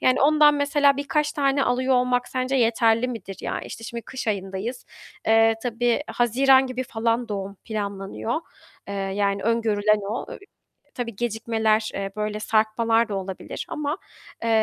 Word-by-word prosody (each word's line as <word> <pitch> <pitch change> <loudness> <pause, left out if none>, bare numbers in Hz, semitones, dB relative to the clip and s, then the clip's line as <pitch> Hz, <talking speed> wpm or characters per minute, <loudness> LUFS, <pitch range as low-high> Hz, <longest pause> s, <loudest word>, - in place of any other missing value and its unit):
Yani 255 0 +3
ondan 300 +1 +6
mesela 285 -1 +3
birkaç 300 +1 0
tane 275 -1 +2
alıyor 255 +1 +1
olmak 250 0 +1
sence 255 +1 -1
yeterli 230 0 +3
midir, 225 -5 -6
ya? - - -3
İşte, 230 - -9
şimdi 235 0 -6
kış 255 -3 -5
ayındayız, 200 +4 -3 0.4
eee, 225 0 +5
tabii 240 0 +1
Haziran 260 +3 +4
gibi 255 0 -3
falan 230 0 -1
doğum 200 -1 -4
planlanıyor, 205 +4 -3 0.5
eee, 200 - -4
yani 200 0 -1
öngörülen 215 -2 +2
o. 230 - -3
Eee, - - -8 0.6
tabii, 235 -4 -4
gecikmeler, 220 -1 0 0.2
böyle 210 0 -2
sarkmalar 225 +1 +2
da 200 - -2
olabilir 190 -1 -5
ama, 300 +2 -2 0.5
eee, 230 - 0
230 Hz, 145 wpm, -24 LUFS, 215-255 Hz, 0.6 s, ondan